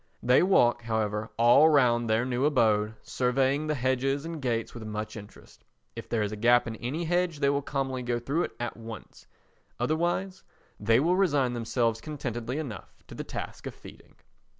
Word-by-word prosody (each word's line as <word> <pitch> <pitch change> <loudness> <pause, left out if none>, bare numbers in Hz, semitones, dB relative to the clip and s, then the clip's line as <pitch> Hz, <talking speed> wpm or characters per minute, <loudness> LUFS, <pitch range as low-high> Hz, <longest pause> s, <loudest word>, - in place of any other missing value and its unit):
They 125 +1 +5
walk, 120 -11 +3
however, 110 -1 -2
all 120 +7 +6
round 120 -6 +3
their 110 +2 +2
new 130 0 -1
abode, 110 -6 +2
surveying 135 +4 0
the 155 - 0
hedges 135 +2 0
and 165 -2 -6
gates 115 -3 -2
with 120 - -8
much 110 0 -5
interest. 105 -1 -13 0.3
If - - -8
there 115 -2 0
is 105 - -2
a - - -4
gap 120 +3 +4
in 115 - -5
any 140 +10 -3
hedge 175 -1 0
they 140 -1 +2
will 140 0 0
commonly 135 -2 -3
go 120 -1 -1
through 140 +8 -1
it - - -9
at 120 -1 -3
once, 115 -1 -11 0.5
otherwise 175 +8 -1 0.4
they 115 +3 +3
will 170 +6 +2
resign 145 -10 +2
themselves 115 -1 -1
contentedly 125 -3 -4
enough 140 -9 -7
to - - -9
the - - -5
task - - -7
of - - -7
feeding. - - -15
125 Hz, 180 wpm, -28 LUFS, 115-145 Hz, 0.5 s, all